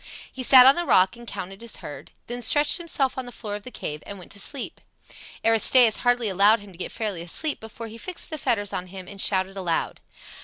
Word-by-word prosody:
He 260 Hz, -, -8 dB
sat 255 Hz, 0 st, +9 dB
on 265 Hz, -, +8 dB
the 345 Hz, -, -2 dB
rock 185 Hz, -, +3 dB
and 235 Hz, 0 st, -14 dB
counted 195 Hz, +1 st, -7 dB
his 235 Hz, -1 st, -7 dB
herd; 145 Hz, -, -10 dB
then 245 Hz, +1 st, -7 dB
stretched 290 Hz, +5 st, +3 dB
himself 275 Hz, -6 st, -2 dB
on 255 Hz, -, -7 dB
the -, -, -9 dB
floor 215 Hz, -4 st, -7 dB
of 205 Hz, -, -5 dB
the 255 Hz, -, -10 dB
cave 150 Hz, -10 st, -7 dB
and 200 Hz, -, -8 dB
went 180 Hz, -, -14 dB
to 200 Hz, -, -8 dB
sleep. 270 Hz, +5 st, -5 dB, 0.6 s
Aristaeus 225 Hz, +1 st, +6 dB
hardly 245 Hz, -2 st, +1 dB
allowed 205 Hz, +3 st, +4 dB
him 205 Hz, -1 st, -14 dB
to 175 Hz, -, -17 dB
get -, -, -4 dB
fairly 210 Hz, -7 st, -4 dB
asleep 280 Hz, -, -3 dB
before 225 Hz, +1 st, -10 dB
he 225 Hz, +1 st, -10 dB
fixed 360 Hz, +2 st, -7 dB
the 310 Hz, -, -4 dB
fetters 220 Hz, -7 st, -1 dB
on 180 Hz, -, -5 dB
him 185 Hz, 0 st, -10 dB
and 200 Hz, 0 st, -7 dB
shouted 190 Hz, 0 st, 0 dB
aloud. 175 Hz, -4 st, -3 dB
220 Hz, 230 wpm, -24 LUFS, 195-250 Hz, 0.6 s, sat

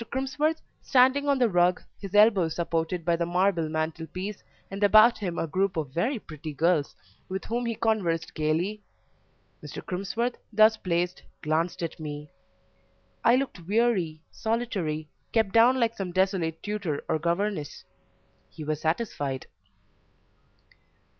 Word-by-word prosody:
Crimsworth, 295 Hz, +4 st, 0 dB, 0.2 s
standing 265 Hz, +2 st, +4 dB
on 280 Hz, -1 st, +3 dB
the 250 Hz, -2 st, +4 dB
rug, 180 Hz, -2 st, +3 dB, 0.2 s
his 195 Hz, 0 st, -7 dB
elbow 205 Hz, -5 st, +5 dB
supported 165 Hz, +1 st, -2 dB
by 170 Hz, -1 st, +3 dB
the 170 Hz, 0 st, -1 dB
marble 175 Hz, -2 st, +1 dB
mantelpiece, 165 Hz, +5 st, -4 dB, 0.3 s
and 195 Hz, +1 st, -3 dB
about 215 Hz, +3 st, +7 dB
him 180 Hz, -5 st, -3 dB
a -, -, 0 dB
group 185 Hz, +3 st, 0 dB
of 150 Hz, -5 st, -2 dB
very 235 Hz, -, 0 dB
pretty 155 Hz, -6 st, -8 dB
girls, 160 Hz, 0 st, +1 dB, 0.3 s
with 190 Hz, +1 st, -4 dB
whom 240 Hz, +1 st, -2 dB
he 230 Hz, -, -1 dB
conversed 185 Hz, -8 st, 0 dB
gaily 165 Hz, +7 st, -1 dB, 0.8 s
Mr. -, -, -8 dB
Crimsworth, 220 Hz, +6 st, -2 dB
thus 215 Hz, +1 st, +6 dB
placed, 180 Hz, -2 st, -1 dB, 0.2 s
glanced 165 Hz, +3 st, 0 dB
at 165 Hz, -, -4 dB
me; 150 Hz, -1 st, -7 dB, 0.9 s
I 235 Hz, -, +6 dB
looked 255 Hz, -11 st, -3 dB
weary, 195 Hz, -8 st, +1 dB
solitary, 200 Hz, -10 st, -2 dB, 0.3 s
kept 220 Hz, -4 st, +2 dB
down 240 Hz, +3 st, +5 dB
like 230 Hz, -1 st, +1 dB
some 190 Hz, -3 st, -4 dB
desolate 185 Hz, -3 st, 0 dB
tutor 200 Hz, -8 st, -3 dB
or 160 Hz, -, 0 dB
governess; 170 Hz, -1 st, -2 dB, 0.7 s
he 155 Hz, -, -9 dB
was 155 Hz, 0 st, -2 dB
satisfied. 155 Hz, -, -2 dB
185 Hz, 135 wpm, -27 LUFS, 160-220 Hz, 0.9 s, about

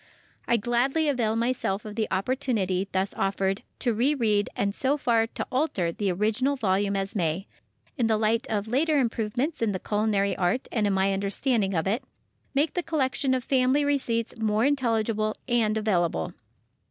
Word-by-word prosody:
I 235 Hz, -, +3 dB
gladly 245 Hz, +8 st, +1 dB
avail 230 Hz, -5 st, +1 dB
myself 230 Hz, -4 st, -1 dB
of 210 Hz, -, -6 dB
the 220 Hz, 0 st, -1 dB
opportunity 195 Hz, -3 st, 0 dB
thus 190 Hz, +1 st, -1 dB
offered 195 Hz, 0 st, -1 dB, 0.2 s
to 240 Hz, -, 0 dB
re 255 Hz, +7 st, +2 dB
read 210 Hz, -5 st, +1 dB
and 200 Hz, 0 st, 0 dB
so 270 Hz, +6 st, +1 dB
far 230 Hz, -5 st, +2 dB
to -, -, -5 dB
alter 250 Hz, -, 0 dB
the 200 Hz, +1 st, -1 dB
original 220 Hz, +9 st, +1 dB
volume 200 Hz, -4 st, +1 dB
as 195 Hz, +2 st, -2 dB
may, 170 Hz, 0 st, -1 dB, 0.5 s
in 235 Hz, -, +3 dB
the 220 Hz, -1 st, +2 dB
light 225 Hz, +2 st, +1 dB
of 210 Hz, -1 st, -1 dB
later 295 Hz, +6 st, +2 dB
improvements 245 Hz, +4 st, -1 dB
in 220 Hz, -3 st, +1 dB
the 185 Hz, -, -3 dB
culinary 205 Hz, -1 st, 0 dB
art 185 Hz, +8 st, 0 dB
and 215 Hz, -3 st, +1 dB
in 200 Hz, -, +1 dB
my 195 Hz, +1 st, +2 dB
understanding 200 Hz, +1 st, 0 dB
of 160 Hz, -, 0 dB
it, 220 Hz, +7 st, 0 dB, 0.5 s
make 295 Hz, +2 st, +2 dB
the 355 Hz, -, 0 dB
collection 270 Hz, -5 st, 0 dB
of 255 Hz, -, -2 dB
family 265 Hz, +2 st, +2 dB
receipts 240 Hz, -5 st, 0 dB
more 215 Hz, +1 st, +2 dB
intelligible 225 Hz, -6 st, 0 dB
and 225 Hz, -3 st, +2 dB
available. 175 Hz, -, 0 dB
220 Hz, 170 wpm, -26 LUFS, 200-255 Hz, 0.5 s, I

